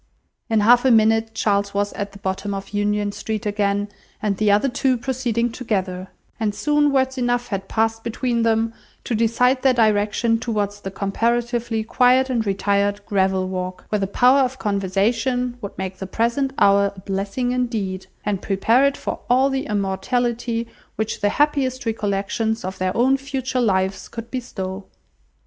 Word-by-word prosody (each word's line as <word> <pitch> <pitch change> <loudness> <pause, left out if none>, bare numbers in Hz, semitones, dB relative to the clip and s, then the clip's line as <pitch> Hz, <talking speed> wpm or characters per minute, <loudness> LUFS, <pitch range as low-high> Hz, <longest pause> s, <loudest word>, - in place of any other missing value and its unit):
In 220 -2 +3
half 240 +3 +6
a 265 - +4
minute 225 -1 +3
Charles 200 -1 0
was 205 0 0
at 200 0 -4
the 200 - -12
bottom 200 +1 -3
of 195 0 -6
Union 205 0 0
Street 215 +1 -4
again, 205 -1 0 0.3
and 205 -2 -1
the 215 0 +2
other 205 +6 +4
two 255 0 +1
proceeding 240 -2 -1
together: 190 -6 -3 0.3
and 210 -2 -1
soon 295 +6 +2
words 265 -1 +1
enough 245 0 0
had 195 -1 -3
passed 225 +1 0
between 235 +1 -1
them 225 0 +1 0.3
to - - -3
decide 240 +3 +2
their 265 -2 +3
direction 220 +1 +2
towards 205 -4 -2
the 195 - -5
comparatively 230 +3 -1
quiet 255 +3 +3
and 230 -4 0
retired 200 +1 0
gravel 190 -2 +1
walk, 185 0 -5
where 210 - 0
the 195 - -1
power 250 +7 +4
of 260 -1 +1
conversation 225 +5 0
would 200 - -7
make 190 0 -4
the 190 - -5
present 235 +7 0
hour 200 0 +4
a - - -11
blessing 200 +6 -2
indeed, 220 -7 -2 0.2
and 205 -2 -1
prepare 225 +6 +2
it 280 - -2
for - - -4
all 260 +3 +4
the 270 0 -2
immortality 230 +4 -1 0.3
which 220 0 -3
the 205 - +3
happiest 275 -1 +1
recollections 220 0 -1
of 190 +1 -5
their 185 +2 -1
own 260 +3 +4
future 265 -2 -2
lives 190 -3 0
could 230 0 -8
bestow. 195 -7 -5
220 Hz, 165 wpm, -22 LUFS, 200-245 Hz, 0.3 s, half